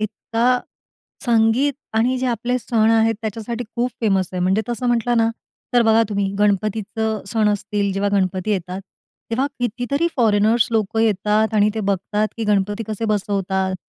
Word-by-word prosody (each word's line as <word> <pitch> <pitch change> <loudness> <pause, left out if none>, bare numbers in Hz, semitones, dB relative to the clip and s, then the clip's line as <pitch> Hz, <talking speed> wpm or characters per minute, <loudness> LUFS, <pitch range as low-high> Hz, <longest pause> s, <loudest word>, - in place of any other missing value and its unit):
इतका 230 +4 0 0.7
संगीत 235 +4 +3 0.2
आणि 245 +3 +2
जे 255 - -1
आपले 240 +1 -1
सण 225 -2 +2
आहेत 225 0 +3
त्याच्यासाठी 225 +2 -4
खूप 245 +1 0
फेमस 195 -5 +1
आहे. 180 - -3
म्हणजे 190 +4 +2
तसं 240 +1 -2
म्हटलं 240 0 +1
ना, 225 0 +3 0.4
तर 240 - +6
बघा 225 0 +4
तुम्ही, 200 -1 0
गणपतीचं 215 +1 0
सण 215 +1 +1
असतील, 205 -1 -1
जेव्हा 200 +1 0
गणपती 185 +1 -1
येतात, 185 -1 -2 0.5
तेव्हा 255 +4 +1
कितीतरी 245 +7 -1
फॉरेनर्स 220 -1 +3
लोकं 220 0 0
येतात 215 +1 +1
आणि 210 0 +4
ते 220 - -2
बघतात, 205 +2 -1
की 225 - -3
गणपती 205 +1 0
कसे 215 +1 -3
बसवतात, 195 -2 -1
220 Hz, 155 wpm, -20 LUFS, 200-230 Hz, 0.7 s, तर